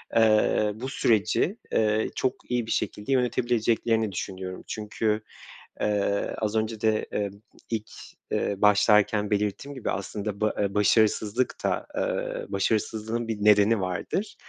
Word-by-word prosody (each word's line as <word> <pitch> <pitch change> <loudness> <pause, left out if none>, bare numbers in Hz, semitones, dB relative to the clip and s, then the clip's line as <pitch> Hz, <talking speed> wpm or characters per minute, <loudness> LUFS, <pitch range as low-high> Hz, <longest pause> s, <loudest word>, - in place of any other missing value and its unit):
eee, 110 -1 +4
bu 125 +4 -5
süreci, 115 - +1
eee, 110 0 +2
çok 130 - 0 0.2
iyi 120 -2 +1
bir - - -5
şekilde 105 +6 -2
yönetebileceklerini 115 -3 +1
düşünüyorum. 95 0 -5
Çünkü, 105 0 -1 0.6
eee, 100 -1 0
az 110 0 -2
önce 110 0 -1
de, 110 -1 +1
eee, 100 -1 0 0.4
ilk, 110 -2 -3 0.4
eee, 100 - 0
başlarken 105 0 +4
belirttiğim 105 +7 -1
gibi 130 - -3
aslında 100 +1 -4
ba 110 - +2
eee, 100 -1 0
başarısızlık 110 +3 +2
da, - - 0
eee, - - -2
başarısızlığın 110 +3 -1
bir 110 -2 -2
nedeni 105 +1 +5
vardır. 95 - -3
110 Hz, 130 wpm, -26 LUFS, 105-115 Hz, 0.6 s, nedeni